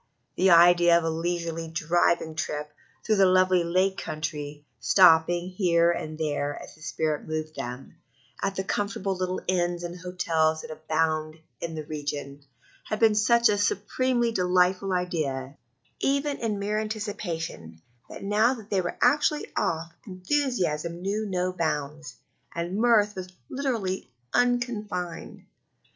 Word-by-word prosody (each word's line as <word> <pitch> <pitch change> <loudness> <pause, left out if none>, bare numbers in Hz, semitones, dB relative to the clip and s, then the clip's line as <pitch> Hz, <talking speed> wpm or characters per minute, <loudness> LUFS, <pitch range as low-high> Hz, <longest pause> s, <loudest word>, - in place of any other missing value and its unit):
The 190 - +3
idea 175 0 +7
of 170 - -1
a 165 - 0
leisurely 165 0 -3
driving 165 0 +1
trip 150 -1 -4 0.3
through 215 -2 +2
the 195 -1 +6
lovely 185 -1 +4
Lake 185 +3 +1
Country, 150 -1 -5
stopping 175 - +5
here 170 -3 +3
and 155 -2 -4
there, 145 -2 -2
as - - -11
the 155 - -21
spirit 155 -1 -2
moved 155 0 -4
them, 125 +2 -7 0.4
at 195 0 -1
the 190 - -2
comfortable 200 0 -2
little 185 0 -2
inns 175 -1 0
and 175 0 -5
hotels 160 -3 0
that - - -9
abound 155 0 -1 0.2
in 165 -1 -5
the 155 -1 -5
region, 145 -2 -5 0.4
had 215 - -3
been 225 -2 +5
such 235 +3 +4
a 205 - +1
supremely 235 +4 +1
delightful 185 0 +2
idea, 150 -7 -2 0.4
even 280 +1 0
in 220 -3 -2
mere 205 +2 -1
anticipation, 195 - -5 0.3
that - - -9
now 215 +5 +3
that 220 -3 -13
they 195 -2 +2
were 175 - -4
actually 300 0 +3
off 165 0 -1
enthusiasm 185 - -1
knew 210 +3 -1
no 185 -1 -1
bounds, 150 -5 -3 0.4
and 170 +2 -3
mirth 215 -2 +4
was 185 -1 -6 0.2
literally 230 -9 -2 0.2
unconfined. 215 -8 -1
180 Hz, 140 wpm, -26 LUFS, 160-205 Hz, 0.4 s, idea